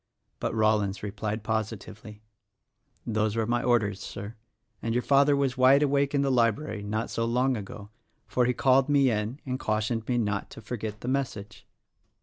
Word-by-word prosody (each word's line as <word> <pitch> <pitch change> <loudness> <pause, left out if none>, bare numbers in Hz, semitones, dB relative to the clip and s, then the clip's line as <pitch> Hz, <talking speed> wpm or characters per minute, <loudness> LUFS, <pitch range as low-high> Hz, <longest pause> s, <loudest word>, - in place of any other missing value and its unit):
But - - -2
Rollins 105 -3 +1
replied 105 +1 -4
positively, 110 -1 -5 0.8
"Those 110 -1 0
were 115 -1 0
my 120 +1 0
orders, 110 -6 +1
Sir; 100 +3 -7 0.5
and 115 0 -2
your 125 - +1
father 140 +1 +4
was 135 -2 0
wide 135 +3 +6
awake 140 0 +1
in 140 - +2
the 135 - +1
library 115 -1 +1
not 110 +2 -3
so 115 - -1
long 125 +3 +1
ago, 105 -1 -8 0.3
for 125 - +1
he 125 - +2
called 135 +1 +3
me 140 -3 +4
in 110 +5 -2
and 130 -1 -3
cautioned 110 +1 -1
me 125 - +1
to 120 - +2
not 100 -1 -3
forget 105 -1 -5
the - - -6
message." 125 -6 -3
115 Hz, 170 wpm, -27 LUFS, 105-130 Hz, 0.8 s, wide